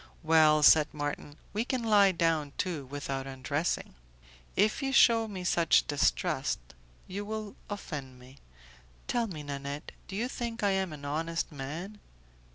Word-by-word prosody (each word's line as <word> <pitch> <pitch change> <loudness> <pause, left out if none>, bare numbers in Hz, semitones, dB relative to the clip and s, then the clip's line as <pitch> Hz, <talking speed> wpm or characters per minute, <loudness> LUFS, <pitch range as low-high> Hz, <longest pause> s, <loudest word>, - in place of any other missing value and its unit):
"Well," 155 -1 +5
said 150 0 +7
Marton, 145 0 -4 0.2
"we 215 +2 0
can 255 -1 -2
lie 205 -3 +5
down, 165 -4 0
too, 165 -8 -2
without 135 -1 -4
undressing." 135 - -2 0.6
"If 215 +6 +2
you 270 0 -1
shew 230 -4 +5
me 190 -4 -6
such 170 -2 +3
distrust, 145 -2 +1 0.5
you 200 +2 -5
will 215 -1 -5
offend 145 -10 -6
me. 130 +2 -16 0.7
Tell 235 -1 0
me, 155 -7 -7
Nanette, 140 0 -5 0.2
do 190 - -7
you 230 +4 -1
think 235 -3 -4
I 200 - +3
am 190 -2 0
an 145 -2 -8
honest 165 +4 -2
man?" 160 +9 -6
165 Hz, 150 wpm, -30 LUFS, 145-205 Hz, 0.7 s, said